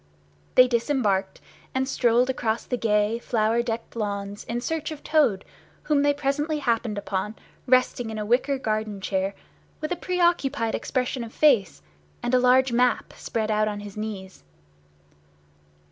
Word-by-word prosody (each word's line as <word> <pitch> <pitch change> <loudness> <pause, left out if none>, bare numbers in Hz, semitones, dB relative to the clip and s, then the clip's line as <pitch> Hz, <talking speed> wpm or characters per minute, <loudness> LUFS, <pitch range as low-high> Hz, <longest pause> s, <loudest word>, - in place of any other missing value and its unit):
They 255 - +8
disembarked, 230 -6 0 0.3
and 260 0 +1
strolled 245 -2 +3
across 230 -3 -1
the 250 - -1
gay 215 -1 +1
flower 230 0 +1
decked 230 0 -5
lawns 205 -2 -4
in 235 +1 -2
search 315 +4 -3
of 310 -2 -8
Toad, 290 -11 +2 0.4
whom 295 -2 +2
they 290 0 +4
presently 290 +2 -1
happened 230 -6 -1
upon 205 +1 -3 0.3
resting 255 -2 +2
in 220 - -5
a 210 - -3
wicker 255 +5 +2
garden 215 -4 -2
chair, 195 0 -1 0.4
with 310 - -4
a - - +1
pre 360 +1 -3
occupied 285 -9 +1
expression 255 -1 -2
of 230 - -8
face, 225 - +3 0.4
and 240 - -1
a 255 - +6
large 255 +1 +4
map 245 +1 +1
spread 220 -1 -2
out 215 0 +2
on 205 -1 -3
his 205 -1 -9
knees. 205 - -6
235 Hz, 155 wpm, -25 LUFS, 210-265 Hz, 0.4 s, They